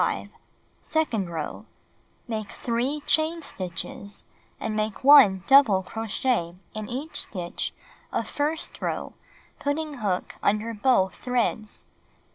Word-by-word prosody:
Second 230 Hz, -, 0 dB
row: 160 Hz, -3 st, -5 dB, 0.6 s
Make 215 Hz, -3 st, -3 dB
3 250 Hz, +5 st, -1 dB
chain 320 Hz, +1 st, +2 dB
stitches, 185 Hz, 0 st, -5 dB, 0.4 s
and 220 Hz, -1 st, -2 dB
make 215 Hz, +1 st, -2 dB
1 260 Hz, -10 st, +8 dB
double 245 Hz, -9 st, +6 dB
crochet 220 Hz, -3 st, -1 dB, 0.2 s
in 215 Hz, -1 st, -5 dB
each 280 Hz, +6 st, -3 dB
stitch 175 Hz, -4 st, -3 dB, 0.4 s
of -, -, -1 dB
first 300 Hz, +2 st, -2 dB
row -, -, -2 dB, 0.5 s
putting 290 Hz, -1 st, -2 dB
hook 195 Hz, -4 st, -2 dB
under 215 Hz, +3 st, +1 dB
both 205 Hz, -4 st, +3 dB
threads. 240 Hz, -3 st, -1 dB
225 Hz, 105 wpm, -26 LUFS, 195-280 Hz, 0.6 s, 1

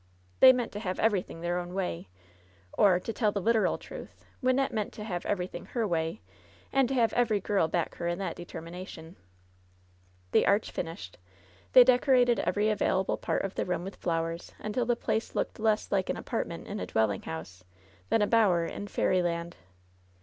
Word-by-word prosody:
They 260 Hz, -, +10 dB
meant 250 Hz, -2 st, -1 dB
to 205 Hz, -, -5 dB
have 185 Hz, -3 st, -3 dB
everything 195 Hz, -6 st, 0 dB
their 175 Hz, +1 st, -1 dB
own 175 Hz, +1 st, -6 dB
way, 140 Hz, -, -3 dB, 0.7 s
or, 185 Hz, -4 st, +4 dB
to 225 Hz, -, -5 dB
tell 215 Hz, -3 st, +1 dB
the 200 Hz, -, -2 dB
literal 225 Hz, +2 st, +2 dB
truth, -, -, -11 dB, 0.2 s
Wynnette 255 Hz, +1 st, +2 dB
meant 215 Hz, -3 st, -2 dB
to 210 Hz, -, -7 dB
have 180 Hz, -5 st, -4 dB
everything 180 Hz, -2 st, -3 dB
her 235 Hz, -3 st, -2 dB
way, 165 Hz, 0 st, -1 dB, 0.5 s
and 270 Hz, -2 st, +4 dB
to 270 Hz, -, -1 dB
have 230 Hz, -3 st, +2 dB
every 225 Hz, -4 st, +2 dB
girl 195 Hz, -4 st, +1 dB
back 170 Hz, +1 st, -1 dB
her 170 Hz, -, -3 dB
in 175 Hz, 0 st, -1 dB
that 195 Hz, 0 st, -3 dB
deter 175 Hz, -1 st, -8 dB
mination. 170 Hz, -1 st, -9 dB, 1.2 s
The -, -, +4 dB
arch 200 Hz, +2 st, +2 dB
finished, 165 Hz, -, -6 dB, 0.5 s
they 255 Hz, -, +10 dB
decorated 250 Hz, -1 st, +4 dB
every 210 Hz, +1 st, +1 dB
available 190 Hz, -2 st, +1 dB
part -, -, -1 dB
of 195 Hz, -, -4 dB
the -, -, -1 dB
room 180 Hz, -1 st, -2 dB
with 195 Hz, +2 st, -7 dB
flowers, 165 Hz, 0 st, -3 dB
until 230 Hz, +3 st, -2 dB
the 240 Hz, -, +3 dB
place 225 Hz, -1 st, -2 dB
looked -, -, -2 dB
less 215 Hz, 0 st, +1 dB
like 195 Hz, -2 st, +1 dB
an -, -, -1 dB
apartment 170 Hz, -8 st, -4 dB
in 205 Hz, +1 st, -4 dB
a -, -, -4 dB
dwelling 110 Hz, -2 st, +1 dB
house 90 Hz, +3 st, -8 dB, 0.5 s
than 220 Hz, -, +3 dB
a -, -, +2 dB
bower 195 Hz, -7 st, +3 dB
in 205 Hz, -, -6 dB
fairy 185 Hz, -2 st, +1 dB
land. 170 Hz, 0 st, -2 dB
195 Hz, 185 wpm, -29 LUFS, 170-225 Hz, 1.2 s, They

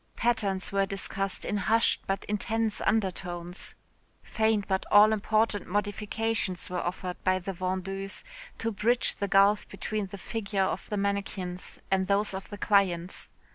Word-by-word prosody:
Patterns 200 Hz, -5 st, +1 dB
were 195 Hz, 0 st, +2 dB
discussed 195 Hz, 0 st, -3 dB
in 210 Hz, -, -1 dB
hushed 225 Hz, +3 st, +3 dB
but 195 Hz, 0 st, -1 dB
intense 220 Hz, +1 st, -1 dB
undertones, 180 Hz, -4 st, -2 dB, 0.5 s
faint 220 Hz, -2 st, +1 dB
but 190 Hz, 0 st, 0 dB
all 210 Hz, +1 st, +8 dB
important 215 Hz, -1 st, +1 dB
modifications 205 Hz, -1 st, -1 dB
were 180 Hz, -, -1 dB
offered 180 Hz, +1 st, -4 dB
by 185 Hz, 0 st, +3 dB
the 195 Hz, +1 st, -4 dB
vendeuse 190 Hz, +2 st, -3 dB, 0.3 s
to 230 Hz, -, -1 dB
bridge 230 Hz, +4 st, +2 dB
the 200 Hz, -, -1 dB
gulf 200 Hz, +2 st, +4 dB
between 215 Hz, -2 st, -3 dB
the 200 Hz, -, -8 dB
figures 200 Hz, -2 st, -1 dB
of 195 Hz, -, -5 dB
the 210 Hz, -, -1 dB
mannequins 195 Hz, -2 st, -3 dB
and 190 Hz, -1 st, +2 dB
those 200 Hz, +1 st, +2 dB
of 190 Hz, 0 st, -6 dB
the 205 Hz, -, -7 dB
clients. 190 Hz, -4 st, +1 dB
200 Hz, 145 wpm, -28 LUFS, 190-210 Hz, 0.5 s, all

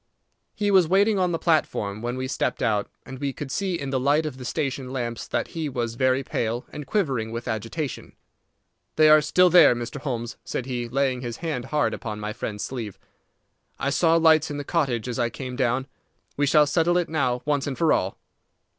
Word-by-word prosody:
He 205 Hz, -1 st, 0 dB
was 185 Hz, -4 st, +5 dB
waiting 200 Hz, +3 st, +3 dB
on 180 Hz, -1 st, +2 dB
the 165 Hz, -, 0 dB
platform 110 Hz, -, 0 dB
when 120 Hz, +2 st, -3 dB
we 130 Hz, 0 st, -3 dB
stepped 130 Hz, -, -2 dB
out, 105 Hz, -3 st, +1 dB, 0.2 s
and 130 Hz, 0 st, -9 dB
we 140 Hz, -1 st, -1 dB
could 135 Hz, 0 st, -7 dB
see 190 Hz, +3 st, -1 dB
in 140 Hz, -1 st, -4 dB
the 130 Hz, -, +1 dB
light 145 Hz, +4 st, +2 dB
of 145 Hz, -4 st, -5 dB
the 125 Hz, -, -7 dB
station 135 Hz, 0 st, -2 dB
lamps 120 Hz, -3 st, -4 dB
that -, -, -2 dB
he 160 Hz, -3 st, -3 dB
was 120 Hz, -3 st, -2 dB
very 130 Hz, +2 st, +1 dB
pale, 120 Hz, -1 st, -2 dB
and 150 Hz, -2 st, -7 dB
quivering 135 Hz, -, 0 dB
with 115 Hz, +1 st, -5 dB
agitation. 115 Hz, +6 st, -4 dB, 0.8 s
"They 155 Hz, 0 st, +6 dB
are 155 Hz, 0 st, +8 dB
still 180 Hz, +5 st, +4 dB
there, 165 Hz, -8 st, +7 dB
Mr. 120 Hz, +4 st, -6 dB
Holmes," 120 Hz, -5 st, -4 dB
said 125 Hz, -, -4 dB
he, 120 Hz, -2 st, -3 dB
laying 130 Hz, 0 st, 0 dB
his 120 Hz, -2 st, -5 dB
hand 155 Hz, -8 st, -3 dB
hard 150 Hz, -1 st, 0 dB
upon 105 Hz, -3 st, -5 dB
my 105 Hz, 0 st, -4 dB
friend's 105 Hz, -1 st, -5 dB
sleeve. 115 Hz, -7 st, -5 dB, 0.8 s
"I 140 Hz, -, -1 dB
saw 165 Hz, +3 st, +3 dB
lights 160 Hz, -2 st, +4 dB
in 145 Hz, -, -4 dB
the 145 Hz, -, -4 dB
cottage 130 Hz, -8 st, -1 dB
as 125 Hz, +1 st, -3 dB
I 120 Hz, -1 st, +1 dB
came 125 Hz, +3 st, -6 dB
down. 130 Hz, 0 st, 0 dB, 0.5 s
We 145 Hz, 0 st, +1 dB
shall 150 Hz, +1 st, +5 dB
settle 165 Hz, +4 st, +2 dB
it 175 Hz, -1 st, +1 dB
now 130 Hz, -6 st, -1 dB
once 145 Hz, -2 st, 0 dB
and 135 Hz, -, -3 dB
for 165 Hz, -2 st, +3 dB
all." 95 Hz, -, -1 dB
135 Hz, 210 wpm, -25 LUFS, 120-155 Hz, 0.8 s, are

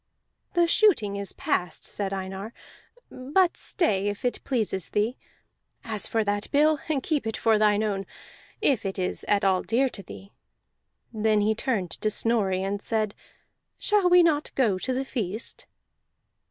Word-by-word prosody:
"The 345 Hz, -1 st, +5 dB
shooting 335 Hz, -, +3 dB
is 200 Hz, -1 st, -4 dB
past," 175 Hz, -2 st, -2 dB
said 200 Hz, -2 st, -3 dB
Einar, 195 Hz, +3 st, -5 dB, 0.6 s
"but 330 Hz, +8 st, +1 dB
stay 205 Hz, -, 0 dB
if 205 Hz, +3 st, -4 dB
it 245 Hz, -, -1 dB
pleases 215 Hz, -, -1 dB
thee. 215 Hz, +4 st, 0 dB, 0.7 s
As 220 Hz, -5 st, -2 dB
for 225 Hz, -1 st, +1 dB
that 205 Hz, 0 st, -2 dB
bill, 300 Hz, +1 st, +3 dB, 0.2 s
keep 295 Hz, -7 st, -1 dB
it 225 Hz, -, -2 dB
for 220 Hz, -1 st, +3 dB
thine 210 Hz, 0 st, +3 dB
own, 195 Hz, -2 st, -2 dB, 0.6 s
if 260 Hz, -6 st, +2 dB
it 195 Hz, 0 st, -3 dB
is 185 Hz, -1 st, -2 dB
at 205 Hz, -1 st, +2 dB
all 190 Hz, -2 st, +3 dB
dear 260 Hz, +4 st, +1 dB
to 205 Hz, -, -7 dB
thee." 195 Hz, +1 st, -12 dB, 0.8 s
Then 215 Hz, -1 st, +2 dB
he 215 Hz, +1 st, +2 dB
turned 215 Hz, -6 st, -1 dB
to 215 Hz, -, -1 dB
Snorri, 200 Hz, -4 st, +1 dB
and 200 Hz, +1 st, -2 dB
said, 215 Hz, -2 st, -1 dB, 0.6 s
"Shall 410 Hz, -4 st, +2 dB
we 355 Hz, 0 st, +7 dB
not 305 Hz, -3 st, +2 dB
go 215 Hz, -8 st, +2 dB
to 260 Hz, -, -2 dB
the 260 Hz, +1 st, -1 dB
feast?" 220 Hz, -4 st, -5 dB
215 Hz, 155 wpm, -26 LUFS, 200-260 Hz, 0.8 s, we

